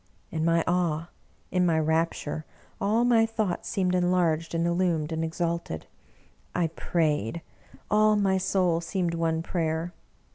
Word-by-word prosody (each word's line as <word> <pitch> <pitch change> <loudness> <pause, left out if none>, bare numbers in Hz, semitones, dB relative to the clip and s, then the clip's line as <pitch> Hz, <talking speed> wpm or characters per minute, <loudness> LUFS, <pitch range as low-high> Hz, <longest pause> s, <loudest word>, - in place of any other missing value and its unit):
In 160 - -2
my 165 0 +3
awe, 170 -2 0 0.4
in 180 0 +2
my 165 -2 +3
rapture, 160 -1 0 0.4
all 220 +4 +2
my 235 -2 +5
thoughts 220 -5 -2
seemed 185 -3 0
enlarged 175 -3 +1
and 165 0 +1
illumed 170 -3 +1
and 160 0 -1
exalted. 165 - -2 0.7
I 170 -2 +1
prayed 160 - -1 0.2
— - - -24
all 215 0 +5
my 195 -2 +2
soul 180 -3 +1
seemed 175 0 -1
one 165 -1 0
prayer. 165 0 -2
170 Hz, 140 wpm, -27 LUFS, 160-185 Hz, 0.7 s, my